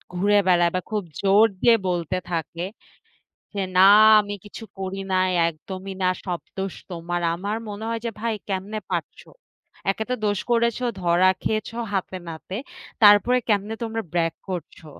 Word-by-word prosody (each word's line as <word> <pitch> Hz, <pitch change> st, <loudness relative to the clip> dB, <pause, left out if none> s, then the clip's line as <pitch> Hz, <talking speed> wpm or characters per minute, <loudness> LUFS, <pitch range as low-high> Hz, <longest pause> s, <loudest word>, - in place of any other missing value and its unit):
ঘুরে 205 Hz, +3 st, +3 dB
বেড়ায় 175 Hz, -2 st, +4 dB
বা 185 Hz, -, 0 dB
খুব 210 Hz, -2 st, -1 dB, 0.2 s
জোর 200 Hz, +3 st, +6 dB, 0.2 s
দিয়ে 235 Hz, -1 st, +6 dB
বলতে 175 Hz, 0 st, -1 dB
থাকে, 170 Hz, +1 st, -3 dB, 0.9 s
যে 200 Hz, -, -2 dB, 0.2 s
না 190 Hz, +1 st, +8 dB, 0.3 s
আমি 205 Hz, 0 st, -3 dB
কিছু 215 Hz, +2 st, -9 dB, 0.2 s
করি 190 Hz, 0 st, -4 dB
নাই, 185 Hz, 0 st, +3 dB, 0.2 s
একদমই 185 Hz, +4 st, -6 dB
না। 185 Hz, -, +4 dB, 0.2 s
সব 175 Hz, -3 st, -2 dB, 0.2 s
দোষ 190 Hz, -1 st, -3 dB, 0.2 s
তোমার। 175 Hz, 0 st, -3 dB
আমার 200 Hz, +5 st, -3 dB
মনে 205 Hz, +1 st, -6 dB
হয় 230 Hz, 0 st, -2 dB
যে 230 Hz, -, -1 dB
ভাই 230 Hz, 0 st, -1 dB, 0.2 s
কেমনে 195 Hz, +3 st, -3 dB
পারছো? -, -, -4 dB, 0.6 s
একে 220 Hz, -, -4 dB
তো 250 Hz, -, +1 dB
দোষ 205 Hz, -1 st, +1 dB
করেছো, 235 Hz, +1 st, +1 dB, 0.2 s
ধরা 175 Hz, +1 st, +4 dB
খেয়েছো 220 Hz, +1 st, -2 dB, 0.2 s
হাতে 190 Hz, -1 st, -2 dB
নাতে। 165 Hz, +4 st, -7 dB, 0.5 s
তারপরে 205 Hz, +4 st, +7 dB
কেমনে 210 Hz, +2 st, +1 dB
তোমরা 225 Hz, 0 st, -3 dB
brag 165 Hz, -1 st, +1 dB, 0.2 s
করছো? 170 Hz, -2 st, -6 dB
195 Hz, 155 wpm, -23 LUFS, 175-210 Hz, 0.9 s, না